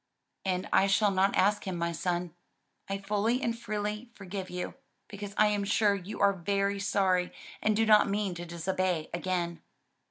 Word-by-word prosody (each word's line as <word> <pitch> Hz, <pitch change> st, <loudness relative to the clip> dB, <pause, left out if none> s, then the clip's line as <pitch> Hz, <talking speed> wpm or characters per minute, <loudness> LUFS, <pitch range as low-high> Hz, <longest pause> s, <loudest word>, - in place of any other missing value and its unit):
"And 185 Hz, -1 st, -1 dB
I 195 Hz, -, +5 dB
shall 200 Hz, +1 st, +3 dB
not 195 Hz, +1 st, +2 dB
ask 205 Hz, +1 st, +2 dB
him, 185 Hz, -, -2 dB
my 170 Hz, 0 st, -1 dB
son. 175 Hz, 0 st, -2 dB, 0.6 s
I 195 Hz, -, -1 dB
fully 210 Hz, +5 st, 0 dB
and 230 Hz, 0 st, 0 dB
freely 210 Hz, +1 st, -4 dB
forgive 195 Hz, -1 st, -6 dB
you, 180 Hz, 0 st, -4 dB, 0.3 s
because 205 Hz, -1 st, -7 dB
I 215 Hz, -, +6 dB
am 205 Hz, -1 st, 0 dB
sure 205 Hz, 0 st, +3 dB
you 200 Hz, +2 st, -6 dB
are 200 Hz, 0 st, +5 dB
very 200 Hz, +2 st, 0 dB
sorry 190 Hz, -2 st, +1 dB, 0.3 s
and 215 Hz, 0 st, +2 dB
do 225 Hz, +1 st, +3 dB
not 215 Hz, -2 st, +6 dB
mean 200 Hz, -2 st, 0 dB
to 175 Hz, 0 st, -6 dB
disobey 175 Hz, -1 st, -1 dB
again." 175 Hz, -1 st, -2 dB
195 Hz, 170 wpm, -30 LUFS, 180-205 Hz, 0.6 s, I